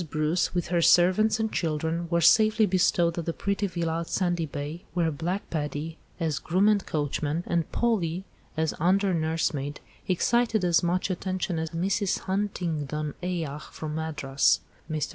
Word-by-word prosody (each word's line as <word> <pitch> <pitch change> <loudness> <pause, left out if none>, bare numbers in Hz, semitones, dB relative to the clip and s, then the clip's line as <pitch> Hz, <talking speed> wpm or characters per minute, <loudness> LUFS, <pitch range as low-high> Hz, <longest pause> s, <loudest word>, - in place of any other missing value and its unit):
Bruce, 155 +5 0
with 175 -2 -1
her 170 -1 +2
servants 185 +6 +4
and 220 -1 0
children, 165 +1 -1
were 170 0 +2
safely 215 +5 +5
bestowed 175 -3 +2
at 165 - -4
the 165 - 0
pretty 200 +2 -1
villa 170 -3 -2
at 170 - -5
Sandy 175 -3 0
Bay, 145 +4 -6
where 165 -2 +2
Black 175 +7 -3
Paddy, 150 +1 -3 0.2
as 155 -4 -1
groom 185 +7 +2
and 210 -2 +3
coachman, 150 +2 -1
and 170 -2 -1
Polly, 190 -7 0 0.3
as 160 -1 +1
under 190 +3 +3
nursemaid, 155 -3 -1 0.3
excited 220 +2 +2
as 170 -2 +4
much 180 +2 0
attention 185 -1 -2
as 160 0 -2
Mrs. 190 +4 0
Huntingdon's 160 -7 -2
ayah 165 -5 -3
from 150 0 -7
Madras. 150 -4 +1 0.3
Mr. 155 -3 -1
170 Hz, 155 wpm, -27 LUFS, 155-185 Hz, 0.3 s, safely